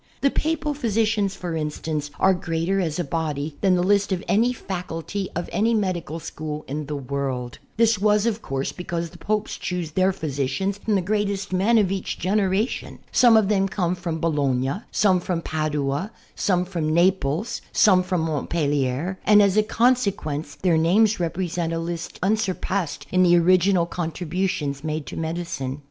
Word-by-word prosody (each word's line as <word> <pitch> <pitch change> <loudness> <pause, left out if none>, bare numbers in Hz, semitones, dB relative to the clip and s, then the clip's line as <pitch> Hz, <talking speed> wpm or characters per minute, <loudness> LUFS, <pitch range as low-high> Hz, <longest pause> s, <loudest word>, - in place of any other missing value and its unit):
The 275 - +3
Papal 310 -1 -1
physicians, 215 -6 0
for 175 -2 -4
instance, 150 -1 -3
are 190 - +5
greater 175 +2 -1
as 160 -4 -2
a 175 - 0
body 150 -1 -3
than 190 -2 +4
the 175 - +1
list 200 +1 +2
of 185 -1 -1
any 230 +5 +3
faculty 190 -3 -5
of 175 - -2
any 225 +2 +2
medical 180 -6 -2
school 155 -1 -6
in 145 +1 -4
the 150 - -3
world. 135 -3 -3 0.2
This 225 -2 +3
was, 210 +1 +3
of 225 -1 0
course, 135 0 -3
because 170 -2 -4
the - - -14
Popes 215 0 -2
choose 175 -3 -3
their 185 +4 +2
physicians 155 +4 -2
from 215 0 0
the 190 - +1
greatest 200 -1 -1
men 205 +6 +3
of 200 -4 +3
each 195 -1 -3
generation. 200 +4 0
Some 235 -3 +6
of 215 -3 +3
them 195 -1 +2
came 175 -1 0
from 175 -3 -4
Bologna, 140 0 0
some 190 -3 +3
from 175 -1 -2
Padua, 150 +3 -1 0.2
some 180 -2 +1
from 170 -4 -2
Naples, 180 +4 +1
some 190 -3 +5
from 180 -2 -1
Montpellier, 150 +1 -1
and, 210 -1 +6
as 200 -2 +4
a 215 - +6
consequence, 200 - 0
their 170 +2 +2
names 200 +6 +3
represent 170 -1 -2
a - - -1
list 170 0 -5
unsurpassed 195 -4 -1
in 185 - +3
the 175 -1 +6
original 180 +1 +4
contributions 170 -3 -2
made 155 -1 -3
to - - -7
medicine. 160 -5 -3
180 Hz, 165 wpm, -23 LUFS, 155-200 Hz, 0.2 s, Some